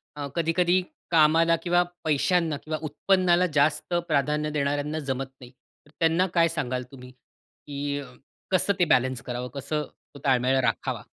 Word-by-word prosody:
अ, 145 -1 -4
कधी-कधी 175 +2 +2 0.3
कामाला 165 +1 +5
किंवा 175 0 +3 0.2
पैशांना 160 +1 +1
किंवा 155 0 -3
उत्पन्नाला 180 +3 +2
जास्त 150 +3 +1
प्राधान्य 150 +2 0
देणाऱ्यांना 145 +1 -1
जमत 135 +1 -1 0.2
नाही. 125 -1 -12 0.5
त्यांना 165 +2 +3
काय 170 -1 +4
सांगाल 130 -6 -3
तुम्ही? 125 -2 -12
कि 145 +2 -7 0.5
कसं 190 +2 +2
ते 175 - +4
बॅलन्स 130 -5 +2
करावं 125 0 -4
कसं 150 +2 -2 0.4
ताळमेळ 130 0 +3
राखावा? 115 - -2
150 Hz, 130 wpm, -26 LUFS, 135-165 Hz, 0.5 s, कामाला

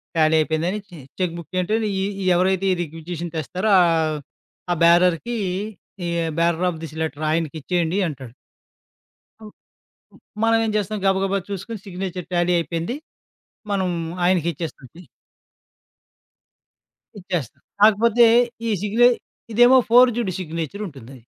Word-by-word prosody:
ఖాళి 160 0 +3
అయిపోయిందని 165 +6 0
చె 175 - -12 0.2
cheque 175 -2 -1
book 185 +2 -7
అంటే 200 +5 0 0.2
ఈ - - 0 0.2
ఈ - - -3
ఎవరైతే 190 +1 +1
ఈ - - 0
రిగ్విజేషన్ 165 +1 -7
తెస్తారో 185 +8 -1
ఆహ్, 160 -2 +1 0.5
ఆ - - +2
బ్యారర్‌కి 180 +7 +3 0.7
ఈ - - -2 0.3
బ్యారర్ 170 +1 +2
ఆఫ్ 160 - -9
దిస్ 160 0 -8
లేటర్ 155 -1 -3
ఆయనకిచ్చేయండి 165 +3 -1
అంటాడు. 130 -5 -9 1.1
అవ్ 215 - -10 0.6
హ్మ్. - - -20 0.2
మనవేం 225 -1 +2
చేస్తాం 210 +1 -2
గబా 190 0 +3
గబా 195 +1 0
చూసుకొని 200 +3 -5
సిగ్నేచర్ 180 -1 -5
ట్యాలీ 175 0 +2
అయిపోయింది. 170 +8 -3 0.8
మనం 190 -2 0 0.4
ఆయనకిచ్చేస్తుంటాం. 170 -3 -2 2.1
ఇచ్చేస్తాం 175 - -5 0.2
కాకపోతే 230 +2 +5 0.4
ఈ - - +1
సిగ్నేచ 235 +4 +4 0.4
ఇదేమో 245 +3 +6
ఫోర్జుడు 240 -5 +4
సిగ్నేచరుంటుందది. 160 - -6
180 Hz, 115 wpm, -22 LUFS, 160-200 Hz, 2.1 s, ఇదేమో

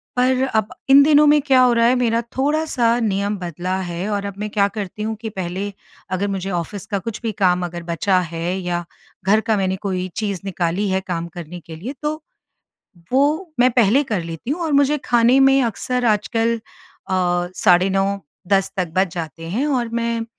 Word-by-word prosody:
पर 255 +1 +2
अब 215 -2 +2 0.2
इन 275 +1 +9
दिनों 300 0 +5
में 295 0 +5
क्या 265 -2 +4
हो 250 -1 +5
रहा 230 0 +3
है 245 +2 +4
मेरा 235 -2 +1 0.2
थोड़ा-सा 275 -5 +1
नियम 200 -1 0
बदला 180 +1 -4
है 175 +3 -4
और 200 -1 -2
अब 200 - -4
मैं 210 0 -3
क्या 200 -1 +2
करती 205 0 -6
हूँ 220 0 -2
कि 225 - -4
पहले 190 0 -4 0.4
अगर 190 +2 -1
मुझे 195 -1 -3
ऑफ़िस 175 +2 -4
का 200 - 0
कुछ 225 +4 -6
भी 225 -2 -2
काम 180 -3 +1
अगर 170 0 -6
बचा 175 +3 +1
है, 170 +1 -3
या 175 -1 -3 0.4
घर 210 +3 +4
का 220 -1 0
मैंने 190 -1 0
कोई 185 -2 -1
चीज़ 205 -4 -2
निकाली 185 +1 -1
है 190 0 0
काम 170 -2 -3
करने 175 0 -8
के 165 - -9
लिए 225 - -6
तो 305 +1 -2 0.9
वो 305 +6 +1
मैं 250 +1 +5
पहले 240 +3 +4
कर 210 -9 -2
लेती 165 +8 -6
हूँ 315 +5 -2
और 315 - -1
मुझे 285 +1 +3
खाने 240 +2 +4
में 270 0 +5
अक्सर 245 +2 -1
आजकल 225 +2 +1
अ, 180 -5 -3
साढ़े 180 +2 +4
9 195 0 +2 0.4
10 195 -1 +2
तक 185 -2 -1
बज 190 0 +3
जाते 165 -1 -6
हैं। 245 +10 0
और 255 -5 0
मैं 230 0 -1
205 Hz, 195 wpm, -20 LUFS, 180-245 Hz, 0.9 s, इन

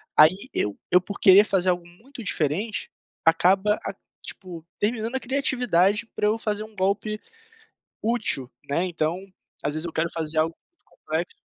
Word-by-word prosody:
aí 155 +4 +7 0.2
eu 105 -1 -1
eu, 180 - +6
por 200 +2 -8
querer 195 +2 +8
fazer 190 -3 +1
algo 175 -1 -4
muito 235 +8 -12
diferente, 195 +5 -1 0.3
acaba 190 +5 +4
a - - -4 0.3
tipo 175 -4 -5 0.2
terminando 225 +3 -1
a - - +1
criatividade 240 -6 +2
pra 210 - +1
eu 220 +2 +2
fazer 210 -1 -2
um 215 0 -13
golpe 200 +3 -1 0.8
útil, 215 - +2 0.2
né, 165 +6 +1
então, 175 +2 -2 0.4
às 145 +1 -1
vezes 155 +2 -1
eu 165 - -6
quero 165 +1 0
fazer 160 -1 -2
algo 165 +1 +1
muito 345 - -46
complexo 460 - -4
190 Hz, 160 wpm, -25 LUFS, 165-215 Hz, 0.8 s, querer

